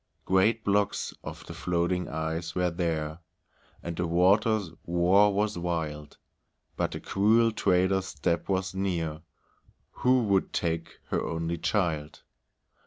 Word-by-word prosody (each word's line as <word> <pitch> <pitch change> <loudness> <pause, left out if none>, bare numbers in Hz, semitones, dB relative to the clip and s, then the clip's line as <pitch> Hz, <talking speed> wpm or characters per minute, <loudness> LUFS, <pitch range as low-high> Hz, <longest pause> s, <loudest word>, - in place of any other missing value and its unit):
Great 105 +4 +3
blocks 100 0 0
of - - -8
the - - -8
floating 90 0 -1
ice 80 +2 -3
were 90 -1 +1
there, 80 -2 -2 0.6
And 85 -1 -4
the 90 - 0
water's 95 +3 +3 0.2
roar 90 +4 +4
was 105 -1 0
wild, 80 -4 -3 0.6
But - - 0
the - - -6
cruel 110 +3 +3
trader's 95 -2 +2
step 85 +1 -2
was 95 -1 0
near, 85 -5 -2 0.7
Who 125 0 +2
would 100 -3 +1
take 85 -1 -2
her - - 0
only 85 0 -3
child. 80 -8 -1
90 Hz, 125 wpm, -28 LUFS, 85-100 Hz, 0.7 s, roar